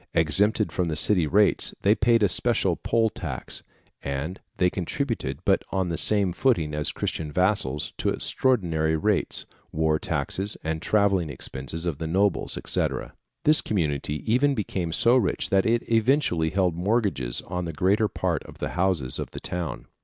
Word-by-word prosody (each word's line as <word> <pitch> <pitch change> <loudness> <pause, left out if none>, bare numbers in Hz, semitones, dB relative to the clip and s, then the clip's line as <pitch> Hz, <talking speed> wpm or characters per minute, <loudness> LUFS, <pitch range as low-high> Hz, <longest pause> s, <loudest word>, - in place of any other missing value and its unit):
Exempted 100 +7 +3
from 90 -2 -1
the 80 - -2
city 85 +1 +5
rates, 105 +6 +3
they 100 - +5
paid 115 0 +2
a - - +5
special 90 - +2
poil 115 -1 0
tax, - - -6 0.4
and 70 +7 -4 0.2
they 90 - +3
contributed, 95 - -3
but 95 - +2
on 95 -2 -1
the 85 - -2
same 100 0 +3
footing 85 - +1
as 75 0 -1
Christian 75 -2 -4
vassals, 90 -6 0
to - - 0
extraordinary 85 -11 +1
rates, 105 +3 -1 0.3
war 80 0 +1
taxes, 100 +2 -2
and 80 0 -3
travelling 100 -5 +1
expenses 70 +4 -6
of 80 -5 -3
the 80 - -3
nobles, 95 +4 0
&c. - - 0 0.6
This 155 +1 +6
community 75 -6 -2
even 135 +5 +2
became 95 -6 -3
so 115 +8 +3
rich 125 - -1
that 95 +1 +3
it 115 +1 0
eventually 115 - +1
held 95 -1 +1
mortgages 90 - -1
on 90 0 -4
the 85 - -4
greater 100 +7 +1
part - - -2
of - - -13
the - - -4
houses 90 -8 -1
of - - -4
the - - -8
town. 90 -2 -5
90 Hz, 165 wpm, -25 LUFS, 80-105 Hz, 0.6 s, This